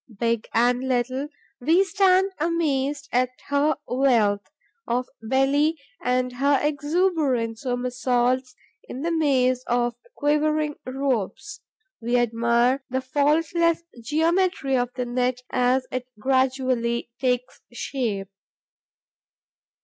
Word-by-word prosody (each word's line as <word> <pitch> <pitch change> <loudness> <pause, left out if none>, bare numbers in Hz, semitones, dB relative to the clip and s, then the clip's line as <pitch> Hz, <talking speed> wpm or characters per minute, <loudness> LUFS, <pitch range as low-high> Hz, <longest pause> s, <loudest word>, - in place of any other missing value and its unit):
Big 230 -1 0
and 245 +2 +2
little, 255 +2 -1 0.3
we 325 +9 +4
stand 385 0 +3
amazed 295 -4 0
at 250 +1 +2 0.2
her 285 +1 +2
wealth 235 -6 +2 0.5
of 250 +2 0
belly 275 +6 +2 0.3
and 250 0 0
her 280 +1 +3
exuberant 290 -6 0
somersaults 250 0 0 0.3
in 265 - -7
the 340 - 0
maze 260 -6 +2
of 240 0 +1 0.2
quivering 300 +1 +1
ropes; 260 - -2 0.4
we 240 +2 +1
admire 235 +2 +2
the 260 +1 0
faultless 310 +5 +1 0.2
geometry 320 0 +1
of 245 -1 +1
the 250 -1 -2
net 250 +1 -1
as 255 +1 +2
it 255 0 -4
gradually 255 -2 0
takes 250 -1 -1
shape. 230 -6 -3
260 Hz, 105 wpm, -24 LUFS, 245-295 Hz, 0.5 s, we